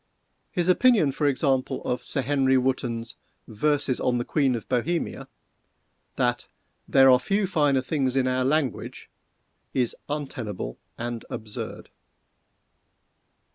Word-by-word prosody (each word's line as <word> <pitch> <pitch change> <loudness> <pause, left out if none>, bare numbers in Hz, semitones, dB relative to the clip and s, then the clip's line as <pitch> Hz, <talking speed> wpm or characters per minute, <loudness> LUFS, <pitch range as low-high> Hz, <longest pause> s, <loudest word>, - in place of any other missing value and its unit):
His 175 -1 -1
opinion, 190 - +4
for 145 +2 0
example, 135 -2 0
of 125 0 -2
Sir 135 - -1
Henry 135 0 +3
Wotton's 125 -2 -1 0.3
"Verses 140 +3 0
on 125 -1 +1
the 120 - -2
Queen 135 -5 +1
of 115 - -6
Bohemia"—that 125 -3 -4 0.4
"there 135 -1 +6
are 125 - +6
few 195 +10 0
finer 145 -7 +2
things 135 -1 -1
in 135 -1 +2
our 130 0 +1
language," 135 -2 -1 0.6
is 125 -2 +1
untenable 120 - -4 0.2
and 120 -1 -4
absurd. 110 -1 -6
130 Hz, 115 wpm, -25 LUFS, 125-145 Hz, 0.6 s, there